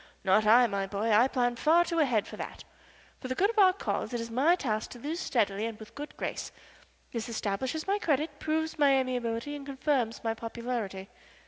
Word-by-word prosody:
Not 210 +3 +3
I, 240 +3 +7
my 200 -3 -2
boy. 210 +3 -1
I 235 +5 +6
plan 245 -2 +1
too - - -11
far 335 +3 +5
ahead 270 -11 +2
for - - -9
that. - - -7 0.6
For 255 - -6
the 255 - -2
good 400 - +3
of 450 - -1
our 380 -2 +7
cause 365 -8 -3
it - - -1
is 230 0 -5
my 285 +9 +4
task 220 -10 -2
to 245 - -11
lose 310 +7 -4
steadily 215 - 0
and 225 -2 -6
with 215 -1 -12
good 295 +1 -8
grace. - - -4 0.6
This 230 0 -4
establishes 235 +7 -2
my 400 +1 +1
credit, 295 -4 0
proves 315 0 -2
my 285 -2 +5
amiability, 250 +1 -2
and 285 - -7
confirms 270 -4 -1
my 225 -1 0
popularity." 225 -4 -4
250 Hz, 205 wpm, -29 LUFS, 225-295 Hz, 0.6 s, I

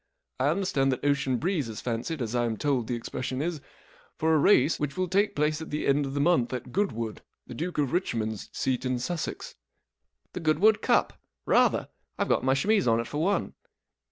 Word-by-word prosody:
I 130 - +2
understand 150 -5 +1
that 130 +2 -3
Ocean 140 -3 +1
Breeze 155 - -1
is 110 - -6
fancied, 125 +5 -3
as 115 0 -4
I 120 -1 +1
am 115 -2 -2
told 135 -5 0
the 120 - -1
expression 125 +2 -4
is, 160 0 -2 0.6
for 160 +1 +2
a 155 - +4
race 145 -2 +4
which 145 -2 -3
will 185 0 0
take 200 +4 +1
place 150 +2 0
at 160 - -7
the 150 - -2
end 140 0 +2
of 135 - -6
the - - 0
month 140 -5 +2
at 125 0 -5
Goodwood, 115 - -2 0.2
the - - -9
Duke 175 +2 -4
of 145 -2 0
Richmond's 110 - -2
seat 130 -1 -1
in 130 -1 0
Sussex." 155 +7 -4 0.4
*' - - -50
The - - -4
Goodwood 165 +7 +3
Cup, - - +1 0.2
Rather - - +3 0.3
I - - +1
Tve - - -9
got - - +2
my 130 +1 +3
chemise 200 - +2
on 115 0 +3
it 115 - -2
for 150 +4 -3
one." 200 +4 0
140 Hz, 215 wpm, -27 LUFS, 125-165 Hz, 0.6 s, a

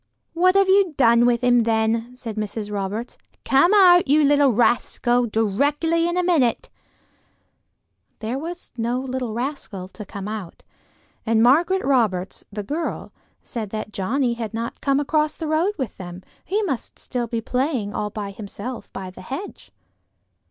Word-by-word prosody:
"What 365 +3 +3
have 395 -1 +5
you 380 -4 +3
done 235 -2 +5
with 240 -1 +2
him 245 -1 +5
then?" 225 +1 0
said 230 -4 -7
Mrs. 210 0 -4
Roberts. 205 +4 -4 0.3
"Come 275 +7 +4
out, 365 -4 +6
you 300 +3 +4
little 285 -1 +4
rascal, 240 +1 +2
directly 285 - +1
in 345 - -2
a 360 - +2
minute." 310 -10 +1 1.5
There 230 +4 -3
was 345 +4 -7
no 235 +2 -1
little 255 -4 -4
rascal 240 -7 -4
to 210 - -9
come 200 0 -7
out, 210 -5 -7 0.6
and 225 0 +2
Margaret 340 +10 +3
Roberts, 215 -9 +1
the 205 0 -5
girl, 305 +11 -4 0.3
said 225 -5 -5
that 215 0 -5
Johnnie 240 +6 0
had 225 -2 -5
not 230 +1 -5
come 275 0 +2
across 305 +1 0
the 325 - -4
road 325 +6 +1
with 260 -8 -4
them: 180 0 -8 0.2
he 415 +5 0
must 275 - -3
be - - -19
still 245 -2 -3
playing 235 -1 -1
all 210 - -2
by 205 -2 -5
himself 215 +4 -7
by 190 -1 -6
the - - -12
hedge. 270 - -7
245 Hz, 160 wpm, -22 LUFS, 220-295 Hz, 1.5 s, out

